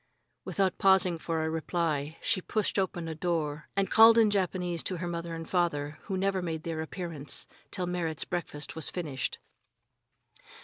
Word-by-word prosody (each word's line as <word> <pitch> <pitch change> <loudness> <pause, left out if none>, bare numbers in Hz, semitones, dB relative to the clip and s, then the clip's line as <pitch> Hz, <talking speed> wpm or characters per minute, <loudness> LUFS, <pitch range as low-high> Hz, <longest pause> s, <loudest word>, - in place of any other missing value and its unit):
Without 190 -2 0
pausing 190 -4 +4
for 160 -1 -1
a - - 0
reply, 160 -2 -1
she 185 - +2
pushed 210 +1 0
open 175 -3 -1
a 160 - -3
door 155 -3 -2
and 195 0 +1
called 225 +1 +8
in 220 -2 +6
Japanese 180 -3 0
to 185 - -2
her 175 +1 -3
father 170 0 -4
and 165 +2 -8
mother, 150 -4 0
who 190 -2 -2
never 195 0 +1
made 160 -3 -3
their 165 -1 -3
appearance 160 -3 -3 0.2
till 185 -2 -1
Merrit's 170 -3 -1
breakfast 170 -4 -4
was 160 -3 -3
finished. 145 -8 -3
170 Hz, 165 wpm, -30 LUFS, 160-185 Hz, 0.2 s, called